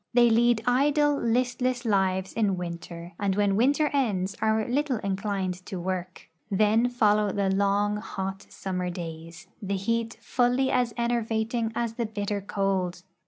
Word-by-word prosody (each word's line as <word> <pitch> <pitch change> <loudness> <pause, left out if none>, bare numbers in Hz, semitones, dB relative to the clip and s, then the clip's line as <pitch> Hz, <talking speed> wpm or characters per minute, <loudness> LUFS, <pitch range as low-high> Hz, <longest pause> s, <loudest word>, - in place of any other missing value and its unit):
They 240 -1 +6
lead 235 0 +3
idle, 290 +4 +3
listless 250 0 0
lives 190 -3 +1
in 205 -4 +1
winter, 170 0 -7
and 200 -2 0
Avhen 205 -1 +3
Avinter 280 +8 +3
ends 205 -8 0
are 220 0 +1
little 270 +1 0
inclined 190 -2 -2
to 190 - -5
Avork. 185 0 -4 0.3
Then 215 +4 +3
folloAv 210 -4 +2
the 195 -1 +1
long, 200 +1 +2
hot 195 -3 -5
summer 180 -2 -3
days, 165 -1 -7 0.2
the 200 -1 -2
heat 230 +3 -1
fully 250 +2 +1
as 245 -2 +2
enervating 230 -1 0
as 235 -1 -1
the 235 -1 -2
bitter 205 -1 -3
cold. 190 -3 -1
210 Hz, 145 wpm, -27 LUFS, 190-240 Hz, 0.3 s, They